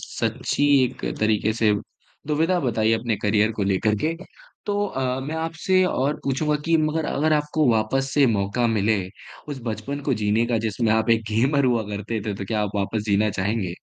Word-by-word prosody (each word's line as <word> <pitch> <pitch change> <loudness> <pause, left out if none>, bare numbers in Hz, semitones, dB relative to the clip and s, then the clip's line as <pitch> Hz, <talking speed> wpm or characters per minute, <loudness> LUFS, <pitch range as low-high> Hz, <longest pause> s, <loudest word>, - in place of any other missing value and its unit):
सच्ची 145 - -2 0.2
एक 125 - -5 0.2
तरीके 110 0 +2
से 110 -1 +2 0.5
दुविधा 160 +4 +1
बताई 115 -3 +1
अपने 115 -1 0
करियर 105 +1 +2
को 105 - -1
लेकर 100 +2 +1
के। 160 - +1 0.5
तो 205 0 0
अ, 130 -4 -2
मैं 145 +4 -5
आपसे 165 +3 +1
और 145 -4 0
पूछूँगा 150 +3 0
कि 165 0 +3
मगर 155 0 0
अगर 155 +3 +1
आपको 150 0 +1
वापस 120 +5 0
से 145 -2 +5
मौका 110 +2 0
मिले, 110 -2 +1 0.5
उस 140 -3 -5
बचपन 115 +6 -4
को 135 - +3
जीने 110 +2 +1
का 120 -1 0
जिसमें 110 +1 0
आप 110 +1 +1
एक 115 0 +3
गेमर 135 +6 +2
हुआ 120 -3 +2
करते 105 +2 -4
थे, 105 - -2
तो 100 - -6
क्या 105 +2 -1
आप 105 - -2
वापस 105 +2 -1
जीना 105 +1 +2
चाहेंगे? 95 -2 -2
115 Hz, 185 wpm, -23 LUFS, 110-145 Hz, 0.5 s, से